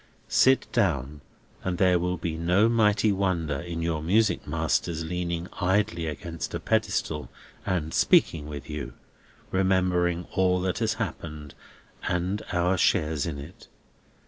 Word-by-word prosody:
Sit 130 0 +4
down, 75 - 0 0.4
and 90 -1 -2
there 90 -1 +4
will 90 +1 -1
be 85 -1 -3
no 90 +6 +3
mighty 110 -2 +3
wonder 85 -7 0
in 85 -1 -4
your 80 -2 -1
music 95 +3 +2
master's 80 -1 -1
leaning 85 0 -3
idly 90 -3 +1
against 80 +3 -5
a - - -2
pedestal 75 -5 -1 0.4
and 80 -4 -1
speaking 75 -3 +3
with 75 -2 -7
you, 75 -2 -6 0.6
remembering 90 -2 +1
all 90 -1 +2
that 95 -1 -1
has - - 0
happened, 75 -3 -5 0.6
and 90 +4 -1
our 90 +1 +1
shares 80 -5 +2
in 75 -4 -4
it. 75 +6 -11
85 Hz, 135 wpm, -26 LUFS, 80-95 Hz, 0.6 s, Sit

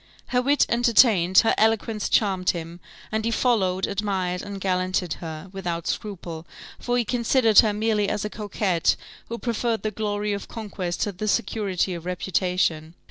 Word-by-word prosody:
Her 250 -1 +2
wit 285 +3 +3
entertained, 230 -6 +4
her - - +4
eloquence 220 -1 +1
charmed 190 -4 +2
him, 170 0 -3 0.3
and 220 0 -1
he 230 - 0
followed, 200 -6 +1
admired, 190 -3 -2
and 200 -1 -7
gallanted 185 -2 0
her, 160 +1 -7
without 175 -3 -4
scruple, 170 -5 -5 0.3
for 245 0 -1
he 240 - +1
considered 235 -2 +4
her 215 - +5
merely 210 -1 0
as 210 - -2
a - - -2
coquette, 200 -5 0 0.3
who 235 - -4
preferred 235 -1 -1
the 215 - -1
glory 210 0 -2
of 200 - -5
conquest 195 -6 -5
to 205 - 0
the 200 +3 -5
security 200 -4 0
of 170 0 -7
reputation. 180 -3 -1
205 Hz, 160 wpm, -24 LUFS, 180-220 Hz, 0.3 s, her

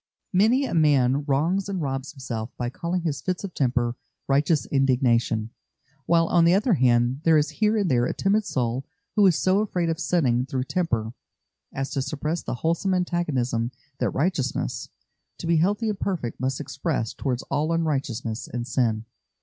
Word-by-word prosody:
Many 225 +9 +4
a - - -4
man 145 -4 +3
wrongs 165 +8 +1
and 195 -2 -2
robs 135 -1 -3
himself 120 -5 -5
by 120 0 -2
calling 170 +4 -2
his 150 -4 -2
fits 185 0 -2
of 195 -3 -5
temper 120 -3 0 0.3
"righteous 145 +3 +2
indignation;" 120 -5 +1 0.6
while, 165 0 +4
on 170 0 +3
the 170 +2 +5
other 215 +3 +2
hand, 125 -2 +2
there 165 -2 +5
is 150 0 +1
here 215 +1 +3
and 195 -7 +1
there 120 -1 +3
a - - -2
timid 205 +3 +2
soul 125 - -1 0.3
who 205 -2 +6
is 180 - +4
so 185 +4 +2
afraid 180 -5 0
of 160 - -4
sinning 130 -9 +1
through 130 -1 -1
temper 120 -9 -1 0.6
as 135 0 -4
to 135 - -1
suppress 150 +4 -2
the - - -4
wholesome 170 +3 +1
antagonism 135 -10 0 0.3
that - - +1
righteousness, 140 -4 -1 0.5
to - - -7
be 165 0 +3
healthy 205 +7 +1
and 210 -2 -2
perfect, 165 -12 -3
must 130 0 -1
express 150 -5 -2
towards 130 -3 -2
all 155 +3 +1
unrighteousness 135 -8 -2
and 120 -1 -4
sin. 115 -3 0
145 Hz, 175 wpm, -25 LUFS, 125-175 Hz, 0.6 s, who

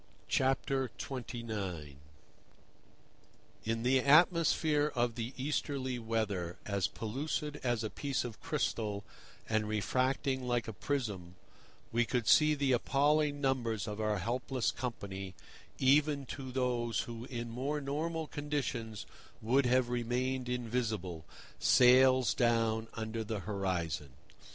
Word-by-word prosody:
XXIX. 120 - -2 1.7
In 115 +1 -1
the 130 +2 +4
atmosphere 155 0 +4
of 120 -1 +1
the 115 +1 -4
Easterly 135 -2 -2
weather, 105 -6 -2
as 100 -2 0
pellucid 145 +6 -3
as 120 -3 0
a 110 - -2
piece 140 -3 -2
of 115 -3 -7
crystal 105 -3 -1 0.4
and 110 -1 +1
refracting 130 +4 0
like 120 -3 0
a 110 - -4
prism, 100 -8 -3 0.6
we 120 +1 +3
could 120 -1 -1
see 155 0 +6
the 140 -2 +1
appalling 145 +3 +2
numbers 120 -6 0
of 105 +1 -4
our 105 -1 +1
helpless 125 +6 -1
company, 95 -6 -5 0.4
even 140 +1 +3
to 130 0 -6
those 120 -3 0
who 115 0 -7
in 120 -3 -5
more 135 +5 -2
normal 155 +3 -2
conditions 140 -8 -3 0.3
would 125 +4 +2
have 125 0 +3
remained 125 +1 -1
invisible, 110 -9 -2 0.3
sails 130 -2 +6
down 115 -2 +1
under 110 0 -3
the 105 -2 -4
horizon. 90 -8 -2
120 Hz, 115 wpm, -33 LUFS, 110-135 Hz, 1.7 s, see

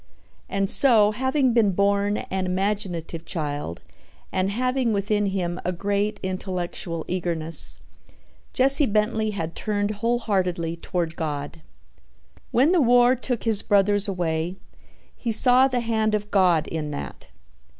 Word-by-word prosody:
And 195 0 0
so, 220 -3 +5
having 260 +2 0
been 215 -5 +3
born 200 +2 +1
an 190 -1 -3
imaginative 185 -4 -3
child 145 - -4 0.5
and 185 0 0
having 250 +2 0
within 205 +1 0
him 180 -2 -3
a 180 - -1
great 200 +3 -2
intellectual 180 -3 -4
eagerness, 170 -3 0 0.7
Jesse 275 +2 +5
Bentley 215 +1 0
had 170 -6 -4
turned 205 -1 -1
wholeheartedly 195 -7 -1
toward 170 -1 -3
God. 145 - -5 0.9
When 270 +7 +3
the 360 -3 +3
war 245 0 +4
took 245 -2 -3
his 220 -3 +2
brothers 205 0 +2
away, 175 -2 -2 0.6
he 235 - -3
saw 250 +3 +5
the 250 -2 -1
hand 220 -2 0
of 210 0 -5
God 180 -5 +3
in 155 -2 -4
that. 145 - -7
200 Hz, 130 wpm, -23 LUFS, 175-225 Hz, 0.9 s, so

